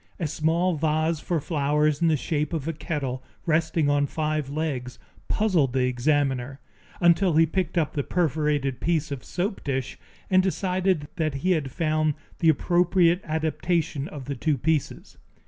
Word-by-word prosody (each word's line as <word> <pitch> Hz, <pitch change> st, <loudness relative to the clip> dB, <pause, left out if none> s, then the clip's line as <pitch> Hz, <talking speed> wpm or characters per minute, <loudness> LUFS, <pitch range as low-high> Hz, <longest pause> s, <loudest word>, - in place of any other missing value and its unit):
A 170 Hz, -, -1 dB
small 160 Hz, +3 st, +1 dB
vase 155 Hz, +1 st, +1 dB
for 170 Hz, +1 st, -1 dB
flowers 150 Hz, 0 st, +1 dB
in 170 Hz, -, +4 dB
the 155 Hz, -2 st, +3 dB
shape 150 Hz, +3 st, -2 dB
of 155 Hz, -2 st, -3 dB
a 165 Hz, -, -1 dB
kettle 140 Hz, -4 st, -3 dB, 0.2 s
resting 160 Hz, -1 st, +1 dB
on 145 Hz, 0 st, +2 dB
five 155 Hz, -2 st, -2 dB
legs 140 Hz, -4 st, -3 dB, 0.3 s
puzzled 175 Hz, -, +1 dB
the 130 Hz, -1 st, +2 dB
examiner, 135 Hz, 0 st, 0 dB, 0.4 s
until 175 Hz, 0 st, +4 dB
he 165 Hz, +1 st, +6 dB
picked 175 Hz, +1 st, -2 dB
up 155 Hz, -3 st, +1 dB
the 145 Hz, -, 0 dB
perforated 150 Hz, -5 st, 0 dB
piece 160 Hz, -3 st, 0 dB
of 140 Hz, -3 st, -4 dB
a -, -, -20 dB
soap 195 Hz, +3 st, -3 dB
dish, 135 Hz, -3 st, -3 dB, 0.3 s
and 185 Hz, -1 st, +4 dB
decided 185 Hz, -4 st, 0 dB
that 155 Hz, -4 st, -1 dB
he 185 Hz, -, +4 dB
had 155 Hz, -6 st, 0 dB
found 155 Hz, 0 st, 0 dB, 0.2 s
the 165 Hz, -, +4 dB
appropriate 175 Hz, +2 st, +3 dB
adaptation 160 Hz, -1 st, -1 dB
of 140 Hz, -4 st, -8 dB
the 140 Hz, +1 st, -4 dB
two 150 Hz, +2 st, 0 dB
pieces. 150 Hz, +2 st, -2 dB
155 Hz, 165 wpm, -25 LUFS, 145-170 Hz, 0.4 s, he